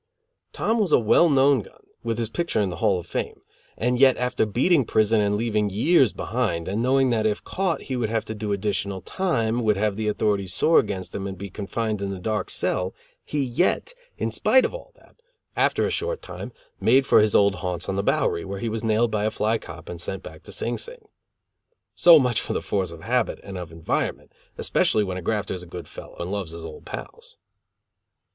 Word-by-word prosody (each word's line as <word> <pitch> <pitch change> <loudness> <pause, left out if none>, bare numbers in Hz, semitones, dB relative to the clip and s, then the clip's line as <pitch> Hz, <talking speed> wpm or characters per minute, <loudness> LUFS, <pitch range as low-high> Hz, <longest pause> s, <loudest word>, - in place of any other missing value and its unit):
Tom 225 +1 0
was 200 -7 +1
a - - +7
well 120 +9 +4
known 140 -1 +4
gun, - - -17 0.2
with 115 -1 -2
his 115 -2 -3
picture 170 -7 -1
in 100 -3 +1
the - - -6
Hall 95 - +2
of 90 - -6
Fame, - - -4 0.4
and 125 +1 0
yet, 130 -1 +6
after 125 -3 0
beating 135 - +3
prison, 110 -1 +2
and 105 0 +1
leaving 105 -1 0
years 125 - +4
behind, 105 -9 -2
and 100 +4 -1
knowing 130 +1 +3
that 110 -2 +2
if 105 -1 -2
caught 185 -3 -1
he 130 - -4
would 120 -3 -1
have 115 -1 -1
to 110 - -5
do 105 -1 -4
additional 100 -1 -1
time, 120 -11 0
would 105 -2 +2
have 105 0 0
the 110 -1 -2
authorities 100 -3 0
sore 165 - +5
against 100 -6 -3
him 100 0 -3
and 95 -1 -6
be 100 +1 -7
confined 105 +1 -3
in 100 - -2
the 100 - -4
dark 105 +1 -2
cell, 90 0 -1 0.3
he 145 -2 -1
yet, 175 - 0 0.2
in - - -2
spite - - +4
of - - -3
all - - -9
that, - - -24 0.4
after - - +2
a - - -1
short 465 +2 -2
time, - - -7 0.3
made 135 +1 +4
for - - +6
his 105 -1 +2
old 100 -1 +5
haunts 90 -1 -3
on 95 - -2
the 100 - +1
Bowery, 85 -4 +1
where 100 0 -5
he 115 +3 -3
was 110 +1 -3
nailed 110 +1 +2
by 105 -1 0
a - - +2
fly 110 +1 0
cop - - -11
and 85 -1 -7
sent 95 +2 -5
back 80 0 -10
to 100 - -11
Sing 115 +4 -1
Sing. 470 -3 -8 0.8
So 170 -2 +8
much 125 -5 +2
for - - -4
the - - -1
force 95 -3 -1
of 85 -1 -10
habit 120 +2 0
and 100 -1 -8
of 90 -3 -6
environment, 80 0 -2 0.3
especially 105 - +2
when 95 -2 -3
a - - -5
grafter 105 +3 -1
is 90 - -6
a 90 - -11
good 85 -2 -8
fellow - - -11
and 85 +2 -4
loves 100 -5 -4
his 85 -1 -8
old 80 -2 -10
pals. - - -9
110 Hz, 220 wpm, -24 LUFS, 95-125 Hz, 0.8 s, So